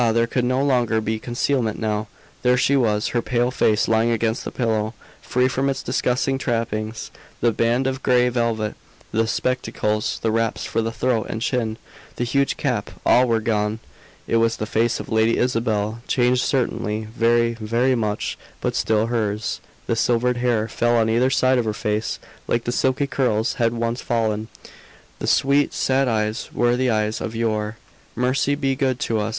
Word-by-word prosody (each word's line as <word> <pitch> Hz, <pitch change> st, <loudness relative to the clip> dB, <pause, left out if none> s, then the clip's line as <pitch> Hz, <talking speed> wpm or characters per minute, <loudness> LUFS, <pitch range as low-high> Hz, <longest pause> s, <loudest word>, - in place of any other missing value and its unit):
there 115 Hz, 0 st, +3 dB
could 125 Hz, +1 st, -1 dB
no 130 Hz, +2 st, +1 dB
longer 120 Hz, -5 st, +2 dB
be 110 Hz, 0 st, -2 dB
concealment 120 Hz, -1 st, -1 dB
now! 110 Hz, -1 st, -1 dB, 0.3 s
There 125 Hz, 0 st, +3 dB
she 135 Hz, +2 st, +3 dB
was, 110 Hz, -5 st, +1 dB
her 120 Hz, -, 0 dB
pale 120 Hz, +1 st, 0 dB
face 110 Hz, -5 st, +2 dB
lying 110 Hz, +1 st, +3 dB
against 115 Hz, -1 st, 0 dB
the -, -, -4 dB
pillow, 110 Hz, -2 st, -1 dB, 0.3 s
free 125 Hz, +1 st, +1 dB
from 135 Hz, +1 st, 0 dB
its 135 Hz, -1 st, -3 dB
disguising 130 Hz, +1 st, 0 dB
trappings. 115 Hz, -3 st, -2 dB, 0.3 s
The 120 Hz, -, +3 dB
band 120 Hz, +4 st, +1 dB
of 130 Hz, 0 st, -2 dB
gray 125 Hz, -1 st, +3 dB
velvet, 115 Hz, -3 st, -1 dB, 0.4 s
the 115 Hz, +1 st, +1 dB
spectacles, 110 Hz, -3 st, -1 dB
the 110 Hz, -, +2 dB
wraps 115 Hz, 0 st, 0 dB
for -, -, -1 dB
the 115 Hz, 0 st, -2 dB
throat 120 Hz, -1 st, 0 dB
and 110 Hz, -, -3 dB
chin, 115 Hz, -2 st, -1 dB, 0.4 s
the -, -, -2 dB
huge 140 Hz, +3 st, +1 dB
cap, -, -, -1 dB, 0.2 s
all 125 Hz, +1 st, +5 dB
were 115 Hz, -1 st, +2 dB
gone. 105 Hz, -1 st, 0 dB, 0.5 s
It 115 Hz, -, +1 dB
was 115 Hz, 0 st, +2 dB
the 110 Hz, -, -3 dB
face 115 Hz, +1 st, +1 dB
of -, -, -6 dB
Lady 110 Hz, +1 st, +2 dB
Isabel; 115 Hz, -2 st, 0 dB
changed, 125 Hz, 0 st, +2 dB
certainly, 115 Hz, -5 st, -1 dB
very, 115 Hz, 0 st, +3 dB
very 115 Hz, +3 st, +1 dB
much; 105 Hz, -3 st, -2 dB, 0.2 s
but -, -, -1 dB
still 110 Hz, 0 st, +2 dB
hers. 110 Hz, -2 st, -2 dB, 0.2 s
The 115 Hz, -, 0 dB
silvered 120 Hz, +2 st, +1 dB
hair 120 Hz, -3 st, +1 dB
fell 120 Hz, +1 st, +1 dB
on 110 Hz, -1 st, +2 dB
either 120 Hz, +3 st, +3 dB
side 130 Hz, -1 st, +3 dB
of 120 Hz, -, 0 dB
her 110 Hz, -1 st, -1 dB
face, 105 Hz, +1 st, -1 dB, 0.3 s
like 115 Hz, -, 0 dB
the 120 Hz, -, -2 dB
silky 130 Hz, +3 st, +1 dB
curls 125 Hz, -5 st, 0 dB
had 115 Hz, 0 st, +3 dB
once 115 Hz, +1 st, -2 dB
fallen; 110 Hz, -2 st, -1 dB, 0.7 s
the -, -, -4 dB
sweet, 140 Hz, +1 st, +3 dB
sad 135 Hz, 0 st, +2 dB
eyes 110 Hz, 0 st, -1 dB
were 120 Hz, 0 st, +2 dB
the 130 Hz, 0 st, +1 dB
eyes 110 Hz, 0 st, 0 dB
of 110 Hz, -, -4 dB
yore. 110 Hz, -1 st, -1 dB, 0.4 s
"Mercy 130 Hz, +3 st, +1 dB
be 135 Hz, -2 st, 0 dB
good 130 Hz, -2 st, 0 dB
to 110 Hz, -1 st, 0 dB
us!" 105 Hz, +1 st, -1 dB
115 Hz, 180 wpm, -22 LUFS, 110-125 Hz, 0.7 s, all